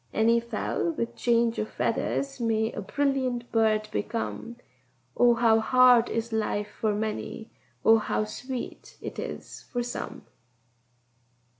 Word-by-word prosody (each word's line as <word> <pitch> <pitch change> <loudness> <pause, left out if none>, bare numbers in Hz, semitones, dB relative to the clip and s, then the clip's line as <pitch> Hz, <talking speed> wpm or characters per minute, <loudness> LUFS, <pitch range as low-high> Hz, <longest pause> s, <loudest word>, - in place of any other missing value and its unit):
Any 230 +2 +4
fowl 235 +8 -2
with 235 -6 -3
change 235 -1 +2
of 215 - -2
feathers 275 -1 -1
may 225 -1 +1
a - - -5
brilliant 255 0 -1
bird 215 -1 +2
become: 230 +2 -3 0.6
Oh, 240 -1 +5
how 225 -1 +4
hard 250 0 +5
is 230 0 -2
life 210 -1 -1
for 215 -2 +1
many! 220 +1 -4 0.3
oh, 225 0 +7
how 215 - -1
sweet 250 +4 -7
it - - -6
is - - -7
for 245 -1 -1
some! 245 - -6
230 Hz, 130 wpm, -27 LUFS, 220-245 Hz, 0.6 s, oh